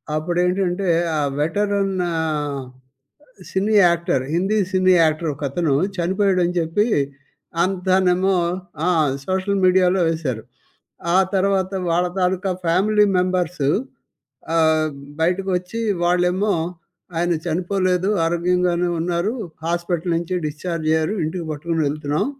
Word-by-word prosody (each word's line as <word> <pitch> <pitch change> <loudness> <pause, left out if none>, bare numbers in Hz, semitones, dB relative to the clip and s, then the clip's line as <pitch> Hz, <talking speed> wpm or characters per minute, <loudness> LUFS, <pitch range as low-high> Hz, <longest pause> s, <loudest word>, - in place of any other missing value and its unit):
అప్పుడు 165 +3 -2
ఏంటంటే 185 0 0 0.3
ఆ - - +1 0.2
వెటరన్ 195 +4 0 0.2
ఆహ్, 150 -3 -2 0.9
cine 200 +3 0
actor, 170 -6 +1
Hindi 195 +5 +1
cine 185 0 +4
actor 155 +1 +1
ఒక 145 - -15
అతను 155 -1 0 0.2
చనిపోయాడని 185 0 +1
చెప్పి 165 +6 +1 0.8
అంతానేమో 185 0 +2 0.5
ఆ! - - +3 0.4
సోషల్ 190 +1 0
మీడియాలో 185 0 +4
వేశారు. 145 -9 -2 0.7
ఆ - - +6 0.2
తర్వాత 190 -1 +1 0.2
వాళ్ళ 175 +2 +2
తాలూకా 185 +1 0 0.2
ఫ్యామిలీ 210 +5 +3
మెంబర్సు 180 -5 0 0.9
ఆహ్, 160 -1 +3 0.3
బయటకు 185 +4 +1
వచ్చి 180 +6 -5 0.2
వాళ్ళేమో 180 +4 +2 0.6
ఆయన 175 +1 +1
చనిపోలేదు 185 +2 0 0.2
ఆరోగ్యంగానే 175 +1 +1
ఉన్నారు. 175 +4 -1 0.3
హాస్పిటల్ 170 0 -1
నుంచి 170 +2 -3
డిశ్చార్జ్ 155 +2 -4
అయ్యారు. 160 +5 +1
ఇంటికి 170 +2 -3
పట్టుకొని 165 +2 -2
వెళ్తున్నాం 145 0 -1
180 Hz, 105 wpm, -21 LUFS, 165-190 Hz, 0.9 s, ఆ